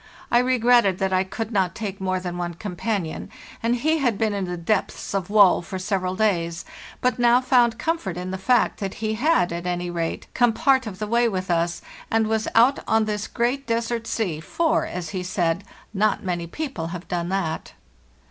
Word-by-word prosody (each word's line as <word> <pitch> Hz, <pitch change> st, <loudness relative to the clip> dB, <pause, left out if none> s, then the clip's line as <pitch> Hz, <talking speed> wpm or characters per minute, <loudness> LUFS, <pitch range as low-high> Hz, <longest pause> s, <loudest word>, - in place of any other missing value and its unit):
I 240 Hz, -, +5 dB
re 255 Hz, +1 st, +2 dB
egretted 235 Hz, -5 st, +4 dB
that 190 Hz, 0 st, 0 dB
I 185 Hz, 0 st, +3 dB
could 220 Hz, +4 st, -5 dB
not 190 Hz, -4 st, +1 dB
take 200 Hz, -3 st, -5 dB
more 185 Hz, -1 st, 0 dB
than 180 Hz, -1 st, -5 dB
one 175 Hz, -1 st, -3 dB
companion, 185 Hz, -2 st, -3 dB, 0.3 s
and 230 Hz, +1 st, +1 dB
he 315 Hz, +6 st, +1 dB
had 240 Hz, -7 st, +1 dB
been 215 Hz, -1 st, +1 dB
in 200 Hz, -2 st, -2 dB
the 180 Hz, 0 st, -4 dB
depths 190 Hz, +4 st, -1 dB
of 195 Hz, -2 st, -2 dB
woe 205 Hz, -3 st, +6 dB
for 190 Hz, +2 st, -6 dB
several 185 Hz, -1 st, -1 dB
days, 175 Hz, -5 st, 0 dB, 0.4 s
but 250 Hz, 0 st, +1 dB
now 240 Hz, 0 st, +5 dB
found 245 Hz, -3 st, +3 dB
comfort 320 Hz, -, -2 dB
in 180 Hz, +1 st, -4 dB
the 190 Hz, -, -4 dB
fact 240 Hz, +5 st, +2 dB
that 195 Hz, -3 st, -4 dB
he 220 Hz, -1 st, -2 dB
had, 230 Hz, -, +2 dB
at 170 Hz, +1 st, -4 dB
any 175 Hz, 0 st, -2 dB
rate, 165 Hz, -1 st, -3 dB
come 240 Hz, -2 st, +3 dB
part 265 Hz, 0 st, +2 dB
of 190 Hz, -3 st, -6 dB
the 215 Hz, -, -3 dB
way 235 Hz, +2 st, +2 dB
with 185 Hz, -3 st, -3 dB
us, 170 Hz, 0 st, 0 dB, 0.3 s
and 225 Hz, 0 st, +2 dB
was 220 Hz, 0 st, 0 dB
out 245 Hz, +5 st, +5 dB
on 220 Hz, 0 st, +3 dB
this 210 Hz, -1 st, -2 dB
great 250 Hz, +3 st, -1 dB
des 230 Hz, 0 st, 0 dB
ert 230 Hz, -1 st, -3 dB
sea, 180 Hz, -9 st, -1 dB
for, 320 Hz, -, 0 dB
as 175 Hz, -2 st, -5 dB
he 185 Hz, +2 st, -3 dB
said, 180 Hz, 0 st, -1 dB, 0.3 s
"not 210 Hz, +1 st, +1 dB
many 175 Hz, -3 st, -2 dB
people 255 Hz, -, -4 dB
have 175 Hz, +1 st, -7 dB
done 175 Hz, -3 st, -2 dB
that." 185 Hz, -5 st, -2 dB
200 Hz, 205 wpm, -23 LUFS, 180-235 Hz, 0.4 s, woe